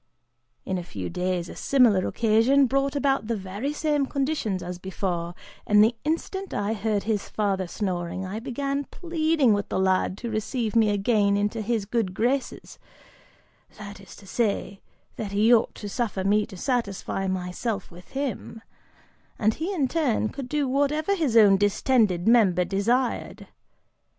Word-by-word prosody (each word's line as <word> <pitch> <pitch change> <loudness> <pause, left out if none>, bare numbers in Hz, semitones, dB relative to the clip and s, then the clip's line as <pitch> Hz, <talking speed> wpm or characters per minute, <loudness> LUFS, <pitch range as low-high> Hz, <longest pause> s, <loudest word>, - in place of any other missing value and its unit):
In 185 -1 -2
a - - -6
few 95 - -6
days, 180 -1 -2
a - - -9
similar 235 -9 +3
occasion 235 +5 +3
brought 275 +2 0
about 275 -5 +1
the 230 -1 -1
very 200 +8 -4
same 295 -2 0
conditions 270 - -1
as 180 0 -6
before, 175 -2 -3 0.3
and 210 0 +6
the 230 +2 +2
instant 355 +5 -3
I 205 +2 -1
heard 210 -1 -1
his 210 -3 -2
father 195 -3 -1
snoring, 180 -1 -3
I 195 +4 -4
began 275 +3 -3
pleading 315 -8 +1
with 205 0 -2
the - - -1
lad 190 0 +1
to 235 +1 -5
receive 220 +1 -2
me 220 -2 +4
again 205 0 +2
into 210 +2 -1
his 215 -1 -1
good 205 -4 -1
graces, 255 +6 -2 1.0
that 205 -1 -9
is 190 - -13
to 200 - -15
say, 200 -1 -2 0.4
that 205 -3 -5
he 215 +4 +4
ought 230 - +2
to 205 - -7
suffer 205 -3 -2
me 205 +2 +2
to 190 - -11
satisfy 200 -4 -2
myself 185 +3 -3
with 175 +1 -14
him, 255 -4 -4 0.7
and 215 0 +2
he 330 - -3
in 305 -9 0
turn 255 -7 0
could 265 -2 -7
do 295 -1 0
whatever 285 +7 +1
his 290 - +1
own 205 -3 +7
distended 205 -2 +2
member 195 -7 +4
desired. 235 +7 -1
215 Hz, 160 wpm, -25 LUFS, 195-265 Hz, 1.0 s, own